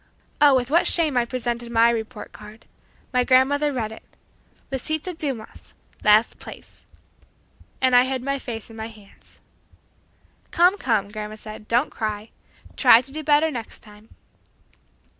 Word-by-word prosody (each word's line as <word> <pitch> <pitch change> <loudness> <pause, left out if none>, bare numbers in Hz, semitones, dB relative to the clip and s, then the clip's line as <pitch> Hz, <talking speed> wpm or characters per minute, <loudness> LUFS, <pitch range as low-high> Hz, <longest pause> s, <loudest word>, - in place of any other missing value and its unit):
oh, 290 -2 +7
with 250 +1 -1
what 345 +3 +4
shame 315 -5 +2
I 245 -1 +2
presented 240 -1 -4
my 230 0 +4
report 225 -1 -5
card. 210 +1 -14 0.5
My 250 0 +3
grandmother 275 +4 +3
read 230 -5 -3
it. 220 - -10 0.7
"Lisita 310 +6 -3
Dumas 275 -9 -6 0.3
last 215 +2 +4
place!" - - -13 0.9
and 260 -1 +3
I 245 +1 +6
hid 260 -1 -3
my 275 +1 -2
face 230 -4 -7
in - - -12
my 220 0 -6
hands. 210 -3 -18 1.1
"Come, 360 +4 +3
come," 210 -5 0
grandma 215 0 -6
said, 215 0 -11
"don't 240 +5 +1
cry. 215 -1 -4 0.4
Try 230 - +7
to 270 - -10
do 310 +2 -5
better 300 +2 +3
next 235 -5 -7
time." 210 0 -17
245 Hz, 145 wpm, -23 LUFS, 220-275 Hz, 1.1 s, oh